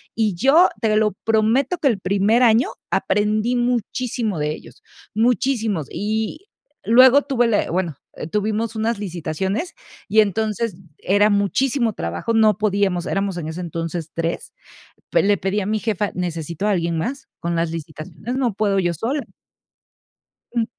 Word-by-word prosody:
Y 215 -3 +1
yo, 285 - +5
te 215 -1 +1
lo 215 0 +3
prometo, 225 +9 +2
que 300 -4 +2
el 220 -5 0
primer 200 +5 +2
año 230 0 +4 0.2
aprendí 215 +4 +1
muchísimo 240 -4 -1
de 150 0 0
ellos, - - -13 0.3
muchísimos. 225 - +1
Y 220 - -3 0.4
luego 255 +6 +7
tuve 250 -4 +1
la 215 -3 +1
bueno, 170 -4 -2 0.3
tuvimos 215 +2 -1
unas 225 +1 0
licitaciones 190 - -3 0.3
y 220 +2 +5
entonces 215 +1 -1 0.2
era 205 +2 +3
muchísimo 230 +4 +1
trabajo. 85 - -3
No 215 -3 +4
podíamos, 200 -4 0
éramos 195 -1 -1
en 160 -2 -4
ese 160 +2 -6
entonces 165 -1 -4
3, 165 0 -3 0.6
pe - - +3
le 205 0 +3
pedí 195 +3 -1
a 190 - -3
mi 215 +1 0
jefa: 210 -2 -1
"Necesito 170 0 -3
a - - +2
alguien 170 -3 0
más, 260 - -4
con 170 0 -2
las 165 0 0
licitaciones 165 - -6
no 255 -4 +1
puedo 200 -1 +1
yo 175 -2 +1
sola". 260 - -2 1.3
Ujú. 235 -2 +1
210 Hz, 150 wpm, -21 LUFS, 180-230 Hz, 1.3 s, luego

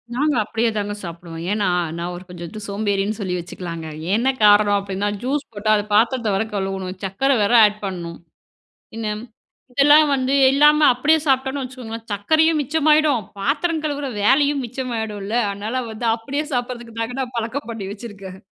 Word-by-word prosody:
நாங்க 295 +1 +1
அப்படியே 225 +2 0
தாங்க 205 0 -2
சாப்பிடுவோம். 170 -1 -8
ஏன்னா, 205 -2 +1 0.3
நான் 175 +1 -4
ஒரு 180 - -9
கொஞ்சம் 175 -1 -8
வந்து 215 +6 -9
சோம்பேறின்னு 205 0 -1
சொல்லி 185 -3 -2
வச்சுக்கலாங்க. 170 -1 -7 0.3
என்ன 245 +4 +2
காரணம் 205 0 +6
அப்டின்னா, 200 +1 -2
ஜூஸ் 275 +3 -1
போட்டா 210 +1 -3
அது 205 - 0
பாத்தரத்த 225 -1 +2
வேற 220 +3 0
கழுவணும், 190 -1 -3
சக்கர 195 +9 0
வேற 205 - +1
ஆட் 210 0 0
பண்ணணும். 170 -3 -5 0.8
என்ன 225 -2 -3
ம் - - -9 0.5
இதெல்லாம் 295 +3 +6
வந்து 265 0 +1 0.2
இல்லாம 295 +2 +5
அப்டியே 300 +5 +3
சாப்டோம்ன்னு 265 +1 +1
வச்சுக்கோங்களேன், 235 -3 -7
சக்கரையும் 315 +10 +2
மிச்சமாயிடும், 300 -3 +3 0.2
பாத்திரம் 325 - 0
கழுவுற 290 -2 -2
வேலையும் 280 +4 +3
மிச்சமாயிடும்ல. 220 -5 -4 0.2
அதுனால 210 +6 -3
வந்து 220 +2 -4
அப்டியே 275 +6 -3
சாப்பிடுறதுக்கு 240 -2 -4
தாங்க, 230 +2 -3
நான் 250 -1 -4
பழக்கம் 230 +2 -4
பண்ணி 205 -4 -5
வச்சுருக்கேன். 195 -4 -9
225 Hz, 155 wpm, -21 LUFS, 200-270 Hz, 0.8 s, காரணம்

